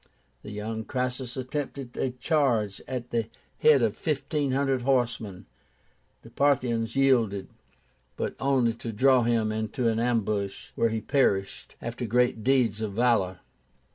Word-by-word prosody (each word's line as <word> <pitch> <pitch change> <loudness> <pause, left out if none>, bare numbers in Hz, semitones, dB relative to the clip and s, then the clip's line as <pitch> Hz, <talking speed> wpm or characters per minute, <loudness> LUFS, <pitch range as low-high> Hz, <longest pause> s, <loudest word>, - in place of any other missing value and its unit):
The - - -9
young 110 +2 -4
Crassus 125 +1 -3
attempted 130 -1 -5
a 130 - 0
charge 125 - 0
at 125 -2 -5
the 115 -2 0 0.3
head 145 -5 +5
of 110 -2 +1
fifteen 145 -1 -1
hundred 135 -1 +1
horsemen. 120 -7 -1 0.8
The - - -14
Parthians 120 -5 +1
yielded, 115 -8 +2 0.7
but - - -2
only 130 -4 +2
to 115 0 -6
draw 130 +3 +4
him 115 -2 +1
into 110 +3 -1
an 110 0 0
ambush, 110 -4 -1
where 115 - +1
he 110 0 -2
perished, 100 -9 0
after 120 +1 -4
great 120 -1 +1
deeds 120 -5 +2
of 105 -2 -3
valor. 105 -5 +1
120 Hz, 140 wpm, -27 LUFS, 110-130 Hz, 0.8 s, head